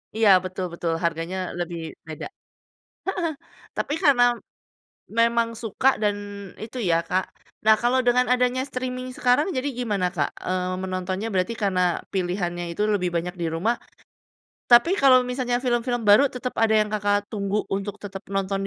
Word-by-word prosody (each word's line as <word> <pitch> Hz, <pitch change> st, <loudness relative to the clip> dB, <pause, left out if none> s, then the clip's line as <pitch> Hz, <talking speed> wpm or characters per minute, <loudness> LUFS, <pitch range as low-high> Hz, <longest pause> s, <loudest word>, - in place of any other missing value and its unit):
Iya, 220 Hz, -2 st, +4 dB
betul 185 Hz, 0 st, -4 dB
betul 170 Hz, -1 st, -2 dB
harganya 170 Hz, +2 st, -1 dB, 0.2 s
lebih 170 Hz, -1 st, -3 dB, 0.3 s
beda. 155 Hz, -, -6 dB, 0.8 s
Heeh, 355 Hz, -4 st, -1 dB, 0.5 s
tapi 290 Hz, -, -1 dB
karena 265 Hz, -4 st, +5 dB, 1.0 s
memang 230 Hz, 0 st, +3 dB
suka 230 Hz, +3 st, -1 dB, 0.2 s
dan 205 Hz, -1 st, +2 dB, 0.5 s
itu 230 Hz, +3 st, -8 dB
ya 165 Hz, -, +4 dB
Kak 185 Hz, +1 st, +1 dB, 0.4 s
nah, 220 Hz, -, +7 dB
kalau 250 Hz, +2 st, +3 dB
dengan 250 Hz, +1 st, +4 dB
adanya 250 Hz, +1 st, +1 dB
streaming 255 Hz, -1 st, -4 dB
sekarang 250 Hz, +6 st, +3 dB
jadi 265 Hz, +3 st, -1 dB
gimana 205 Hz, -6 st, 0 dB
Kak, 145 Hz, -3 st, +1 dB, 0.2 s
eee, 185 Hz, 0 st, -1 dB
menontonnya, 185 Hz, +2 st, -3 dB
berarti 185 Hz, +4 st, 0 dB
karena 185 Hz, -2 st, +2 dB, 0.3 s
pilihannya 175 Hz, -2 st, -1 dB
itu 190 Hz, -, -4 dB
lebih 180 Hz, -3 st, 0 dB
banyak 175 Hz, +1 st, -1 dB
di 170 Hz, -1 st, -3 dB
rumah. 210 Hz, +9 st, 0 dB, 0.9 s
Tapi, 240 Hz, +7 st, +6 dB
kalau 255 Hz, -2 st, +6 dB
misalnya 250 Hz, -1 st, -1 dB
film-film 245 Hz, -1 st, 0 dB
baru 210 Hz, +7 st, +6 dB
tetep 250 Hz, -1 st, -5 dB
ada 220 Hz, -1 st, +4 dB
yang 210 Hz, -, +1 dB
Kakak, 205 Hz, 0 st, 0 dB
tunggu 200 Hz, 0 st, -1 dB
untuk 195 Hz, +1 st, -2 dB
tetep 195 Hz, 0 st, -7 dB
nonton 195 Hz, 0 st, 0 dB
210 Hz, 150 wpm, -24 LUFS, 185-245 Hz, 1.0 s, nah